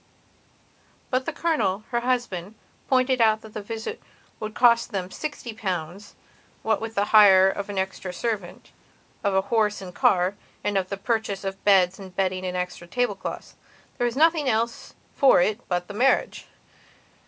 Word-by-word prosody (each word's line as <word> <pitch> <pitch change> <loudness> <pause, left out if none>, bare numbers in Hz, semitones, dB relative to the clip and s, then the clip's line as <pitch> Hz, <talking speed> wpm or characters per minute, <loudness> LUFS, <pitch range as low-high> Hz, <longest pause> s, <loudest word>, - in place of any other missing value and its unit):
But 255 0 0
the - - 0
Colonel, 290 - 0
her 240 - +1
husband, 235 -6 -2 0.3
pointed 255 -1 +2
out 220 -1 +4
that 220 -1 -13
the 215 - -5
visit 225 - -6 0.4
would 215 0 -5
have - - -29
cost 235 -1 +4
them 190 -3 -4
sixty 290 -4 -6
pounds, 190 -1 -5 0.5
what 220 -2 +1
with 225 0 -6
the 200 - +2
hire 195 -3 +8
of 200 +1 -3
an 200 - -5
extra 190 -1 -3
servant, 200 -2 -4 0.5
of 200 -2 +1
a 190 - +4
horse 215 -2 +2
and 185 -2 -9
car, 180 +1 +2 0.3
and 205 - -1
with 190 -1 0
the 200 - -4
purchase 215 -2 -2
of 195 0 -5
beds 190 -2 +4
and 190 -2 -11
bedding 185 -1 -1
and 180 0 -3
extra 180 -1 -5
tablecloths. 205 -2 -3 0.5
There 245 - +2
was 240 +1 -2
nothing 315 -2 +3
else 230 +1 -2 0.2
for 270 -8 +5
it 210 +5 +1
but 180 -1 -1
the 205 - -8
marriage. 250 +6 +1
205 Hz, 170 wpm, -24 LUFS, 190-235 Hz, 0.5 s, hire